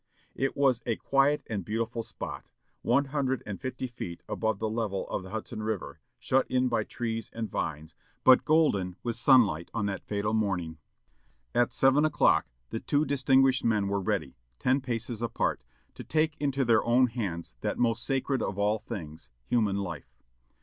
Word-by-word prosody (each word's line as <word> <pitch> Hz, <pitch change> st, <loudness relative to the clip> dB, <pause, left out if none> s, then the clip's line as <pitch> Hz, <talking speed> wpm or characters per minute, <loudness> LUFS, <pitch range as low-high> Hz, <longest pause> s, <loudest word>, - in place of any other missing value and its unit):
It 135 Hz, 0 st, -2 dB
was 135 Hz, -4 st, +3 dB
a 115 Hz, -, +1 dB
quiet 140 Hz, +4 st, +2 dB
and 105 Hz, -4 st, -3 dB
beautiful 115 Hz, +4 st, -2 dB
spot, -, -, -7 dB, 0.3 s
one 140 Hz, +4 st, +3 dB
hundred 135 Hz, -3 st, 0 dB
and 105 Hz, -2 st, -6 dB
fifty 130 Hz, -1 st, -4 dB
feet 115 Hz, -9 st, -7 dB
above 110 Hz, -2 st, -1 dB
the 110 Hz, -, -2 dB
level 110 Hz, -3 st, -2 dB
of -, -, -2 dB
the 95 Hz, -, -10 dB
Hudson 110 Hz, +1 st, -5 dB
River, 110 Hz, -3 st, -4 dB, 0.2 s
shut 130 Hz, 0 st, +1 dB
in 130 Hz, 0 st, +2 dB
by 115 Hz, -3 st, +1 dB
trees 115 Hz, -1 st, -4 dB
and 110 Hz, -3 st, -4 dB
vines, 80 Hz, 0 st, -3 dB, 0.3 s
but 130 Hz, -1 st, +7 dB
golden 105 Hz, -, +2 dB
with 120 Hz, -2 st, -2 dB
sunlight 115 Hz, -, +4 dB
on 105 Hz, -3 st, 0 dB
that 100 Hz, -1 st, -3 dB
fatal 105 Hz, +1 st, -1 dB
morning. 90 Hz, -7 st, -1 dB, 0.7 s
At 120 Hz, 0 st, +2 dB
seven 135 Hz, +3 st, +4 dB
o'clock 155 Hz, -1 st, +3 dB, 0.2 s
the -, -, -2 dB
two 145 Hz, +1 st, +1 dB
distinguished 135 Hz, -2 st, +3 dB
men 105 Hz, -3 st, +2 dB
were 100 Hz, 0 st, 0 dB
ready, 95 Hz, -9 st, -2 dB, 0.2 s
ten 130 Hz, +2 st, +2 dB
paces 120 Hz, -2 st, -4 dB
apart, 115 Hz, -, -1 dB, 0.3 s
to -, -, -9 dB
take 155 Hz, 0 st, +1 dB
into 140 Hz, -2 st, 0 dB
their 115 Hz, -2 st, +4 dB
own 120 Hz, +2 st, +4 dB
hands 100 Hz, -, -4 dB
that -, -, -2 dB
most 115 Hz, -2 st, +1 dB
sacred 135 Hz, -1 st, 0 dB
of 95 Hz, -, -2 dB
all 105 Hz, +2 st, +1 dB
things, 80 Hz, -, -8 dB, 0.2 s
human 110 Hz, -5 st, +2 dB
life. 85 Hz, -10 st, -5 dB
115 Hz, 170 wpm, -29 LUFS, 100-130 Hz, 0.7 s, but